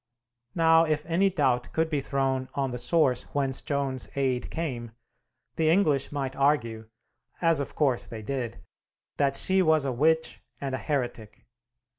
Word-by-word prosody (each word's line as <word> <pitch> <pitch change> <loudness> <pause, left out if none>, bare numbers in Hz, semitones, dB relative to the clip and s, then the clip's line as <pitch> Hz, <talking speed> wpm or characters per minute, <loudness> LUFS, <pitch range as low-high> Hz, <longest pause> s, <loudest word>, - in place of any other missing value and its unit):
Now, 165 -1 +5
if 155 -1 -1
any 175 +4 +2
doubt 130 -9 0
could 160 0 +1
be 150 -3 -1
thrown 135 -1 -1
on 135 -2 -1
the 125 - -4
source 130 -1 +2
whence 135 -2 +1
Joan's 140 -3 -2
aid 130 -3 0
came, 125 -9 -4 0.6
the 160 -1 +2
English 155 -6 +2
might 135 -2 -3
argue 115 -6 0 0.5
(as 165 -3 +3
of 140 - -5
course 135 -5 +1
they 110 -2 -8
did) 125 -1 -3 0.6
that 140 -1 +2
she 190 +6 +2
was 160 -4 +3
a 135 - 0
witch 160 +6 +1 0.2
and 135 -2 -4
a 130 - -2
heretic. 120 -7 -4
140 Hz, 155 wpm, -27 LUFS, 130-160 Hz, 0.6 s, Now